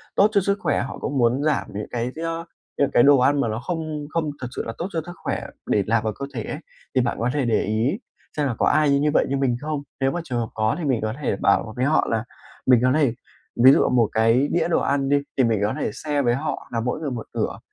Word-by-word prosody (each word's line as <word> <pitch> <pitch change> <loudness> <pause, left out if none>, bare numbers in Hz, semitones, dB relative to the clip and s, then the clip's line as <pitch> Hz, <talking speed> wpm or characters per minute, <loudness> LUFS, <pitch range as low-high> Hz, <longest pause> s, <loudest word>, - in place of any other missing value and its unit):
tốt 200 - +6
cho 200 - +3
sức 200 +2 0
khỏe, - - +1
họ 130 - -5
cũng 140 - -3
muốn 125 +3 +2
giảm 155 -2 +1
những 105 +1 -4
cái 120 +1 -2
do 165 +1 -4 0.3
những 140 - +2
cái 120 - +5
đồ 140 0 +7
ăn 140 +3 +3
mà 120 - 0
nó 110 +1 -2
không 155 0 -4
không 160 -2 -1
thực 125 - -3
sự - - -2
là 115 - -4
tốt 175 - -3
cho 165 - -1
sức 175 - -8
khỏe - - -2 0.2
để 100 - +2
nạp 115 0 +2
vào 110 -1 -1
cơ 140 - -3
thể 115 -4 -4
ấy. 150 - -5 0.4
Thì 130 - +4
bạn 120 -1 -1
có 120 +2 0
thể 145 -3 0
để 115 -2 +2
ý 115 - 0 0.4
xem 145 - +1
là 130 - -1
có - - +3
ai 145 -2 +3
như 150 +1 +2
vậy, - - +3
như 140 - 0
mình 130 -3 +1
không. 150 -1 -3 0.2
Nếu 135 0 +2
mà 175 - -3
trường 125 -6 -3
hợp 115 - -3
có 110 0 0
thì - - -4
mình 130 -5 +1
có 110 0 -2
thể 135 - 0
bảo 100 +3 +1
với 125 - 0
họ 155 +3 +2
là 110 -1 0 0.4
mình 125 -3 +6
có 130 - +4
thể 145 -7 +2 0.5
ví 130 - +10
dụ - - +4
một 120 -4 +3
cái 115 +5 +3
đĩa 170 -1 +1
đồ 170 - +2
ăn 140 -1 0
đi 145 - +4 0.2
thì 130 - +4
mình 115 -3 +2
có 105 - +1
thể - - -1
share 145 -2 -1
với 120 -2 +2
họ 145 +4 -4
là 115 - 0
mỗi 125 +5 -2
người 145 -4 -3
một 115 -3 -5
nửa, - - -2
135 Hz, 280 wpm, -23 LUFS, 115-150 Hz, 0.5 s, ví